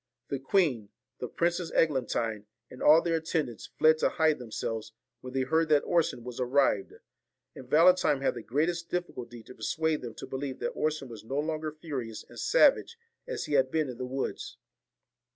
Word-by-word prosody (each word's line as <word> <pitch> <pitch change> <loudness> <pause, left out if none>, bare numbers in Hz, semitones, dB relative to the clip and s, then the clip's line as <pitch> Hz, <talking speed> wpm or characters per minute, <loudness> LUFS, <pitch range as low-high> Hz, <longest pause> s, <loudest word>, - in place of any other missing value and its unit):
The 140 - -2
queen, 135 - +1 0.3
the 125 - -3
Princess 170 +4 -1
Eglantine, 120 -8 0 0.2
and 130 - -11
all 155 +2 +7
their 165 -1 +1
attendants, 155 -7 -3
fled 155 0 +5
to - - +3
hide 160 -3 +2
themselves 110 -2 -5 0.3
when 130 0 -9
they 135 - +1
heard 160 +4 +1
that 150 -2 +4
Orson 165 -8 +1
was 125 0 -7
arrived; 125 -5 +2 0.6
and 130 -1 -12
Valentine 165 -1 +5
had 135 - +1
the 120 - -7
greatest 170 +8 -1
difficulty 120 -10 -5
to 125 - -12
persuade 155 +7 -1
them 120 -3 -7
to - - -7
believe 135 0 -5
that - - -2
Orson 155 -3 -1
was 115 -3 -10
no 135 +5 -4
longer 155 +1 -2
furious 135 -8 -6
and - - -12
savage - - +4 0.3
as - - -3
he 150 - -4
had 135 -2 +4
been 155 -1 0
in 125 -1 -8
the 125 - -3
woods. 130 +1 -4
140 Hz, 180 wpm, -29 LUFS, 125-160 Hz, 0.6 s, all